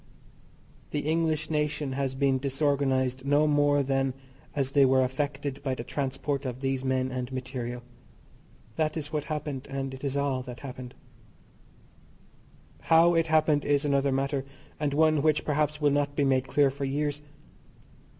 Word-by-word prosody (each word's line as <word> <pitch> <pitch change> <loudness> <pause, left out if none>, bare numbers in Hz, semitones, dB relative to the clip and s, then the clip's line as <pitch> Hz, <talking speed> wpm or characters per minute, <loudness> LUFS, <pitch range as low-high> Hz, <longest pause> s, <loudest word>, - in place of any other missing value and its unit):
The 145 - -2
English 160 0 0
nation 150 -2 -1
has 135 0 -2
been 135 -1 +2
disorganised 135 -2 0
no 145 +2 +3
more 145 -1 +3
than 135 -1 0 0.4
as 135 -2 0
they 140 0 +5
were 130 0 +4
affected 140 +1 -3
by 135 -2 -1
the 120 - -6
transport 140 +1 -2
of 130 -1 -5
these 135 -1 -1
men 130 0 0
and 125 0 -4
material. 125 -2 -5 0.9
That 155 0 0
is 155 0 -5
what 150 -1 -1
happened, 150 -3 -4
and 135 -1 -3
it 130 +1 -10
is 140 0 -1
all 140 -2 0
that 125 -1 -9
happened. 130 -2 -8 1.8
How 165 +1 +5
it 165 -1 +2
happened 155 -2 +3
is 145 0 +1
another 140 -1 +2
matter, 135 +1 0 0.4
and 150 -2 0
one 155 0 +3
which, 155 0 +2
perhaps, 150 0 0
will 145 -1 +3
not 145 0 0
be 145 - +2
made 130 -1 +2
clear 140 0 +3
for 140 +1 -6
years. 145 +1 -1
140 Hz, 160 wpm, -28 LUFS, 130-150 Hz, 1.8 s, they